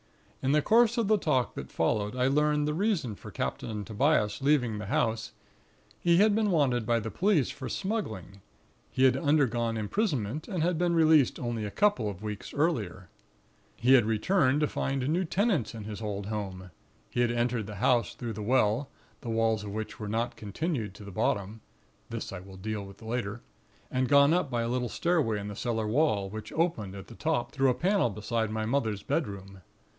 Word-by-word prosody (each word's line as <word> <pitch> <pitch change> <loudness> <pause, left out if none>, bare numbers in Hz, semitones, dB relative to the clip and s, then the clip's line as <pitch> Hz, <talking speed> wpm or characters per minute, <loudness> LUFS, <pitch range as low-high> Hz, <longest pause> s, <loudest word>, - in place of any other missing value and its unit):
In 135 +2 +1
the 150 -1 +3
course 235 +1 +4
of 230 -3 +1
the 215 0 +3
talk 130 -8 +1
that - - -7
followed, 105 +2 0
I 125 0 +1
learned 150 +2 +2
the 150 - 0
reason 170 - 0
for - - -11
Captain 105 -2 -4
Tobias 110 -2 +1
leaving 130 -7 +2
the 105 - -6
house; 115 +1 0 0.7
he 170 +6 +3
had 210 +2 +5
been 215 0 +2
wanted 130 - +2
by 120 -1 +3
the 110 0 -5
police 185 -7 +2
for 130 -2 -7
smuggling. 110 - -4 0.5
He 130 - 0
had 130 -1 +6
undergone 125 -6 +1
imprisonment; 135 - -1
and 180 -6 -1
had 175 -1 +1
been 175 -1 +2
released 155 -5 +4
only 120 -3 -3
a 105 - -3
couple 195 - +2
of 100 0 -8
weeks 105 -1 -5
earlier. 120 - -1 0.7
"He 125 +2 +3
had 125 -5 +6
returned 130 - +2
to 150 - +3
find 135 -2 -2
new 170 +5 +1
tenants 185 - 0
in 110 - -6
his 105 +1 -7
old 100 -2 -3
home. 95 -3 -5 0.4
He - - -3
had 120 - +3
entered 120 -2 0
the 105 - -7
house 120 +4 +2
through 120 -2 -5
the 105 - -6
well, 120 +3 +2 0.3
the 120 - -6
walls 115 -1 +1
of 105 - -6
which 110 +2 -5
were 105 - -5
not 115 +3 -1
continued 110 - -3
to 105 - -11
the 100 - -9
bottom 100 +3 -1 0.5
(this - - -5
I 95 - -5
will 95 +1 -12
deal 105 +1 -4
with 100 +3 -12
later); 110 -1 -3 0.5
and 130 0 0
gone 140 +1 +6
up 175 -5 +1
by 120 -2 -1
a - - -1
little 125 0 -1
stairway 155 -12 +1
in 100 - -6
the 105 - -6
cellar 115 -1 -1
wall, 110 -5 +2
which 110 0 -7
opened 115 - -1
at 95 - -8
the - - -12
top 155 -4 -1
through 135 -1 +2
a 125 - +2
panel 190 - +2
beside 110 +1 -2
my 110 0 -2
mother's 110 -5 -1
bedroom. 100 - -3
120 Hz, 200 wpm, -29 LUFS, 105-150 Hz, 0.7 s, had